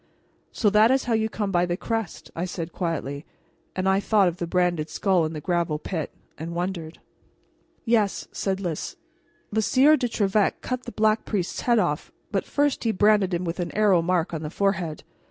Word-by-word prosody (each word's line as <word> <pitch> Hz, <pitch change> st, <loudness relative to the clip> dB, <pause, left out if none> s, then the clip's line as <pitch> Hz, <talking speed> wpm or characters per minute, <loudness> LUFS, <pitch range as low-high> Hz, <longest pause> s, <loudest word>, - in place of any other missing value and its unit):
"So 210 Hz, -, +2 dB
that 215 Hz, +2 st, +6 dB
is 265 Hz, +1 st, +3 dB
how 240 Hz, -, -1 dB
you 220 Hz, 0 st, +1 dB
come 210 Hz, -2 st, -2 dB
by 175 Hz, -1 st, +2 dB
the 175 Hz, 0 st, -1 dB
crest," 225 Hz, -5 st, -4 dB
I 170 Hz, -, -2 dB
said 170 Hz, -2 st, -5 dB
quietly; 150 Hz, -5 st, -3 dB, 0.5 s
but 185 Hz, -, -1 dB
I 190 Hz, 0 st, +3 dB
thought 205 Hz, -1 st, +3 dB
of 175 Hz, 0 st, -2 dB
the 175 Hz, -, -3 dB
branded 175 Hz, -3 st, +1 dB
skull 185 Hz, -5 st, +2 dB
in 155 Hz, -, -4 dB
the 155 Hz, -, -4 dB
gravel 170 Hz, -1 st, 0 dB
pit, 160 Hz, 0 st, -4 dB, 0.3 s
and 165 Hz, +2 st, -5 dB
wondered. 175 Hz, -2 st, -3 dB, 0.9 s
"Yes," 220 Hz, -4 st, +1 dB
said 190 Hz, -1 st, -2 dB
Lys. 175 Hz, -, -4 dB, 0.6 s
"The 220 Hz, +1 st, +1 dB
Sieur 275 Hz, +7 st, +5 dB
de 250 Hz, -3 st, 0 dB
Trevec 205 Hz, -2 st, +1 dB
cut 255 Hz, 0 st, -4 dB
the 240 Hz, -, -6 dB
Black 215 Hz, 0 st, +2 dB
Priest's 190 Hz, -5 st, -2 dB
head 240 Hz, -1 st, +3 dB
off, 170 Hz, -8 st, 0 dB, 0.2 s
but 195 Hz, -2 st, 0 dB
first 290 Hz, -1 st, 0 dB
he 225 Hz, -, +2 dB
branded 205 Hz, -2 st, +3 dB
him 175 Hz, 0 st, -1 dB
with 170 Hz, +2 st, -3 dB
an 175 Hz, -, -2 dB
arrow 200 Hz, -5 st, +4 dB
mark 175 Hz, 0 st, 0 dB
on 160 Hz, -, -3 dB
the 155 Hz, -, -4 dB
forehead. 185 Hz, -4 st, -1 dB
190 Hz, 195 wpm, -25 LUFS, 170-215 Hz, 0.9 s, that